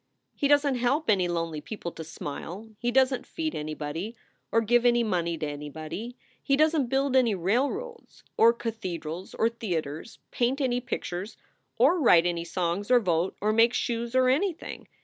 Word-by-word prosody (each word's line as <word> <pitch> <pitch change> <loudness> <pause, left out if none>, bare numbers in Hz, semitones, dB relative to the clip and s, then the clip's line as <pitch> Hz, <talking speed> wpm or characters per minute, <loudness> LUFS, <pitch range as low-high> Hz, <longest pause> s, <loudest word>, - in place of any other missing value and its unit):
He 285 - +1
doesn 285 -1 +4
t 250 - -2
help 260 +2 +2
any 185 -3 +2
lonely 165 -3 -2
people 190 -3 -6
to 165 - -8
smile; 165 +6 -7
he 240 - 0
doesn 260 0 +3
t - - -17
feed 320 -1 -2
anybody, 155 +7 -4 0.4
or 230 - +4
give 240 +2 +3
any 240 -1 +4
money 170 -6 -1
to 155 - -3
anybody; 155 - -6 0.2
he 275 - +1
doesn 310 -2 +3
t - - -9
build 270 +1 +1
any 240 -5 +4
railroads 285 - -2
or 230 - +6
cathedrals 185 -8 -5
or 225 - +2
theaters, 175 -6 -4
paint 250 +3 0
any 250 -3 0
pictures 190 -1 -5 0.4
or 280 +10 +4
write 175 - +6
any 170 -1 -1
songs 175 +3 -2
or 250 -1 +6
vote 175 -4 0
or 210 +1 +2
make 230 +2 +4
shoes 235 +1 -2
or 255 0 +4
anything. 325 +7 -1
225 Hz, 175 wpm, -27 LUFS, 170-255 Hz, 0.4 s, or